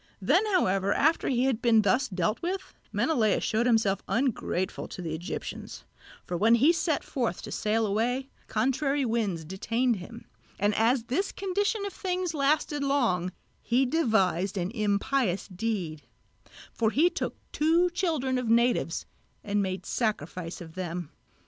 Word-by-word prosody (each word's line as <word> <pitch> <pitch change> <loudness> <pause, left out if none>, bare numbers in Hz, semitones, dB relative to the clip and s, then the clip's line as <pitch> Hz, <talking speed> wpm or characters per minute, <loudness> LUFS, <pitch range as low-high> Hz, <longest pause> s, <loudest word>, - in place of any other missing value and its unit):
Then, 290 - +3
however, 195 - +2
after 315 +3 +2
he 250 -2 +2
had 260 -4 +1
been 230 -3 +4
thus 210 +7 +2
dealt 185 +2 -1
with, 375 +2 -3 0.2
Menelaos 225 -10 +2
showed 225 +2 +1
himself 220 -5 +2
ungrateful 230 -7 -1
to - - -9
the 165 -3 -4
Egyptians; 165 +3 -6 0.4
for 180 - -3
when 220 +6 +5
he 280 +9 +5
set 325 -3 0
forth 235 -10 -2
to - - -7
sail 220 +1 +1
away, 240 +6 0 0.2
contrary 270 +5 +1
winds 210 -8 -1
detained 230 +7 0
him, 230 +6 -10 0.3
and 205 +2 +2
as 230 +3 +2
this 335 - -1
condition 400 +2 -1
of 400 - -5
things 365 -2 -2
lasted 290 0 +1
long, 230 -11 +1 0.3
he 250 +3 +2
devised 200 - +1
an 180 +1 -1
impious 210 -1 0
deed; 185 -6 -3 0.7
for 225 -2 +1
he 300 +9 +4
took 355 - -3 0.2
two 335 +4 +3
children 305 -8 0
of 245 -3 -3
natives 235 -6 +2 0.4
and 205 0 0
made 190 -1 -3
sacrifice 180 - -2
of 160 -2 -10
them. 175 -2 -5
230 Hz, 150 wpm, -28 LUFS, 195-280 Hz, 0.7 s, when